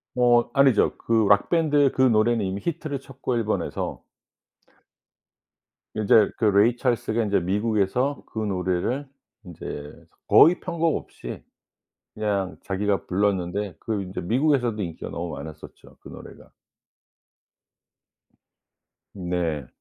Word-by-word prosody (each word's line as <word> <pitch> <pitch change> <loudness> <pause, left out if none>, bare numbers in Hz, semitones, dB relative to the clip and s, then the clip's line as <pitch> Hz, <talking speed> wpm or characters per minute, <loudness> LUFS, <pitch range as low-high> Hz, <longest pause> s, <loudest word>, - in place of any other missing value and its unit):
뭐 120 -1 +4
아니죠. 135 -5 +3
그 115 - -3 0.2
록 100 0 +4
밴드의 150 -5 +3
그 130 - -1
노래는 115 -3 +3
이미 95 +1 -3
히트를 150 -4 -3
쳤고 135 -2 -4
일본에서 110 -2 -2 1.9
이제 110 -1 +4
그 115 - 0
레이 105 +4 +4
찰스가 115 -2 0
이제 100 -1 +2
미국에서 105 +8 0
그 - - -13
노래를 100 +6 -1 0.4
인제 75 -4 -7 0.4
거의 170 +4 +6
편곡 170 -3 0
없이 - - -8 0.7
그냥 100 -3 -2
자기가 100 +1 -1
불렀는데 95 -1 -1
그 110 -3 -2
인제 95 0 -6
미국에서도 120 - +1
인기가 85 -4 -6
너무 85 0 -5
많았었죠, 75 +2 -11
그 - - -12
노래가. - - -13 2.6
네. 85 -7 -3
105 Hz, 245 characters per minute, -24 LUFS, 95-125 Hz, 2.6 s, 거의